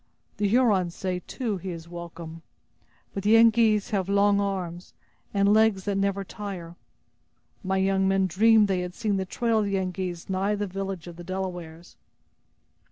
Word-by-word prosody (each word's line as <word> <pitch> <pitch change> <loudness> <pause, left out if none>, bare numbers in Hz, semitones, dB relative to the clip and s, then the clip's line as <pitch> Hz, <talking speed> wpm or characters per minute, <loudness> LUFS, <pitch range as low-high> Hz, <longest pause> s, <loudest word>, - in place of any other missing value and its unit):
The 205 0 +1
Hurons 200 -6 +2
say, 185 -1 -2
too, 230 -7 -3
he 185 +1 -6
is 165 -2 -7
welcome. 170 -1 -8 0.7
But 195 - -3
the 210 +3 +4
Yengeese 225 -1 +4
have 195 -2 -1
long 200 0 +3
arms, 180 -3 -4 0.4
and 200 0 +3
legs 220 -3 +3
that 200 -1 -1
never 195 0 0
tire! 185 -4 -7 0.9
My 190 0 0
young 190 0 +2
men 195 0 +2
dreamed 215 +4 +4
they 190 -2 0
had 180 0 -5
seen 210 -4 -1
the 190 - -2
trail 230 +3 0
of 210 - +1
the 200 -1 -1
Yengeese 185 -2 -3
nigh 195 +2 0
the 205 0 -2
village 195 -2 -5
of 175 -1 -10
the 175 - -8
Delawares!" 175 -2 -6
195 Hz, 165 wpm, -26 LUFS, 180-205 Hz, 0.9 s, the